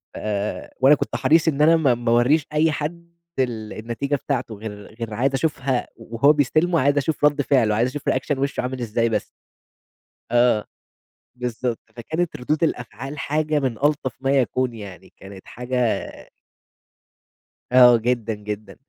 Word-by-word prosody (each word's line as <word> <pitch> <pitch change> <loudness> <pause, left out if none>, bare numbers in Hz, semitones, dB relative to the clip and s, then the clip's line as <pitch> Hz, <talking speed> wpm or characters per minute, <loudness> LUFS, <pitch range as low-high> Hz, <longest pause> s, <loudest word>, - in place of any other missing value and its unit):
آآ، 105 -1 -4
وأنا 135 +3 +6
كنت - - -4
حريص 155 +5 +3
إن 150 -2 +1
أنا 160 +2 +6
ما 140 -6 +3
ما 120 0 -1
أورّيش 130 +6 +3
أي 155 +1 +3
حد 170 +3 -5 0.3
ال 115 -4 -2
النتيجة 120 +6 -3
بتاعته 130 -5 -3
غير 105 0 -9
غير 115 -2 -5
عايز 130 +5 0
أشوفها 135 -3 -1
وهو 115 +5 +2
بيستلمه، 155 +4 +2
عايز 145 +1 +2
أشوف 145 +1 0
ردّ 150 0 +3
فعله 125 -7 +2
عايز 120 +4 +1
أشوف 145 +2 -4
reaction 135 +2 -1
وشُّه 140 +1 -1
عامل 125 0 -4
إزاي 115 0 0
بس. 110 - -1 1.1
آه 120 -3 +3 0.7
بالضبط، 125 -1 -3 0.2
فكانت 160 +7 -3
ردود 150 +4 -1
الأفعال 135 0 -3
حاجة 155 +1 0
من 130 -5 -2
ألطف 145 -3 0
ما 135 0 +1
يكون، 130 0 0
يعني 100 -5 -11
كانت 95 0 -12
حاجة 125 -1 -1 1.7
آه 125 -1 +7
جدًا، 115 -1 -1
جدًا. 105 -1 -7
125 Hz, 150 wpm, -22 LUFS, 115-145 Hz, 1.7 s, آه